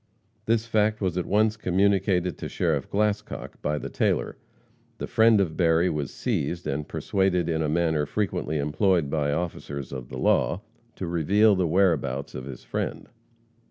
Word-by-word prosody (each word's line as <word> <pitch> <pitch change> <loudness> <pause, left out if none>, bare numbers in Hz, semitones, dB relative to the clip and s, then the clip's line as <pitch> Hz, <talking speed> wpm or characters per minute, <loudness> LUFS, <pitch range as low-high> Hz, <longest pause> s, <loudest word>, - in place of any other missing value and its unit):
This 115 0 +2
fact 110 -1 +1
was 95 -4 -1
at 90 - -2
once 110 +2 +2
communicated 95 -2 +1
to - - -5
Sheriff - - -1
Glascock 105 0 -2
by 75 0 -1
the - - -5
tailor. - - 0 0.6
The - - -4
friend 110 -1 +4
of 85 -5 0
Berry 85 0 +3
was 75 -3 -3
seized, 85 +5 -2
and 75 0 -3
persuaded 95 -3 0
in 80 -1 0
a 75 - 0
manner 80 -2 +1
frequently 85 -6 -2
employed 75 +1 +1
by 75 -2 0
officers 70 -4 -4
of 65 -3 -7
the - - -7
law, 90 - +2 0.3
to 95 - -5
reveal 95 +6 +3
the 90 -2 +1
whereabouts 80 -7 +1
of 65 - -6
his 65 -3 -9
friend. - - -4
85 Hz, 160 wpm, -26 LUFS, 75-100 Hz, 0.6 s, friend